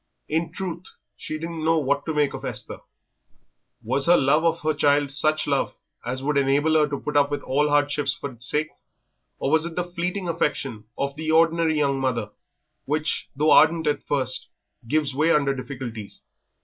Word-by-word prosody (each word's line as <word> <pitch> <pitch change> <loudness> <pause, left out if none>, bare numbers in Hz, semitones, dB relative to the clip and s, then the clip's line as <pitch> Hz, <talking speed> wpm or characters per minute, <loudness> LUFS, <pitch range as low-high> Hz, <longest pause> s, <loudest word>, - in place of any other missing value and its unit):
In 160 +1 -1
truth, 180 -1 -5 0.3
she 155 - -5
didn't 165 0 -5
know 165 +1 +3
what 140 -1 0
to 160 - -1
make 145 -2 +2
of - - -7
Esther. - - -6 1.0
Was 130 +6 0
her 175 - +7
love 140 +4 +3
of 165 0 +1
her 155 0 +1
child 145 -1 +2
such 155 +2 +1
love 140 -1 0 0.3
as 130 +2 -4
would 145 +1 0
enable 140 +3 +2
her 155 -1 +4
to 140 -2 -4
put 150 - -5
up 145 0 +4
with 145 - -3
all 145 +3 +1
hardships 145 0 +1
for 140 - -6
its 120 0 -4
sake, 155 +1 0 0.7
or 135 - -2
was 160 0 +4
it 170 0 -5
the 180 - 0
fleeting 180 +2 -3
affection 140 -9 -2
of 140 0 -2
the 155 +1 -4
ordinary 165 0 +3
young 140 -2 +1
mother, 120 -5 -1 0.5
which, 155 +3 -1
though 150 +3 +2
ardent 160 +1 +5
at 145 -1 0
first, 130 -3 -1 0.4
gives 150 0 0
way 155 +5 +2
under 140 -3 +3
difficulties? 125 -5 -7
150 Hz, 185 wpm, -24 LUFS, 140-160 Hz, 1.0 s, her